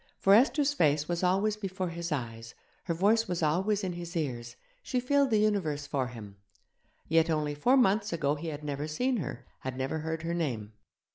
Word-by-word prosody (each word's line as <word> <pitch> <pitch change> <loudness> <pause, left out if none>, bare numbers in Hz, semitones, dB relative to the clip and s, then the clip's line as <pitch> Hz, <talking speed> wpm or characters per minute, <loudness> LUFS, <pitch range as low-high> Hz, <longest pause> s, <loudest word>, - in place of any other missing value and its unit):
For 195 - +4
Esther's 280 +5 +4
face 150 - +2
was 175 -1 -1
always 195 +4 +2
before 190 -3 -3
his 170 0 -5
eyes, 115 -4 -4 0.3
her 170 - 0
voice 215 +6 +3
was 175 -2 -2
always 190 +7 +1
in 185 -2 -2
his 170 0 -6
ears, 120 -6 -3 0.3
she 255 - -1
filled 280 +2 +2
the 220 - +3
universe 190 -9 +1
for 135 -3 -1
him; 105 -5 -10 0.7
yet 165 +1 +3
only 150 -2 0
four 245 - +3
months 210 -3 +3
ago 150 -4 +1
he 150 +3 -5
had 150 -1 -5
never 145 0 -3
seen 250 +12 0
her, 135 - -5
had 130 -1 -5
never 135 +4 -2
heard 160 +1 -4
her 170 +1 -2
name. 120 -11 -3
165 Hz, 195 wpm, -29 LUFS, 145-200 Hz, 0.7 s, For